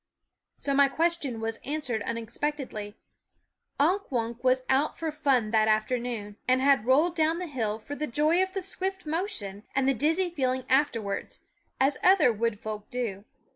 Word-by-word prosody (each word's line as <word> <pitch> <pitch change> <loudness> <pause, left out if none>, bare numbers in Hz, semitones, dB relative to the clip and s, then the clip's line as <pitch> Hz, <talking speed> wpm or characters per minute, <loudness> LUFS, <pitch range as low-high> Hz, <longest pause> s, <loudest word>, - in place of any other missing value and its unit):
So 280 - -1
my 280 0 +6
question 315 -6 0
was 225 0 -2
answered 275 -6 -2
unexpect 235 +6 -2
edly. 210 -7 -6 0.8
Unk 360 +7 +1
Wunk 235 -1 -2
was 255 0 +3
out 275 +3 +1
for 320 -1 -2
fun 265 -7 +1
that 220 -1 +3
afternoon, 215 -1 -1
and 255 0 +4
had 265 -4 +3
rolled 310 +7 +4
down 320 0 +2
the 360 - -3
hill 225 -9 -2
for 225 +6 -8
the 300 +1 -3
joy 305 +7 +2
of 375 0 -1
the 385 -2 -3
swift 380 0 -3
motion 300 - -3
and 270 0 +2
the 275 - +4
dizzy 325 +8 +1
feeling 260 -5 -1
afterwards, 235 -7 0 0.4
as 275 +2 +2
other 355 -10 +5
wood 225 -1 -1
folk 215 -1 -6
do. 220 -5 -4
265 Hz, 170 wpm, -28 LUFS, 225-310 Hz, 0.8 s, my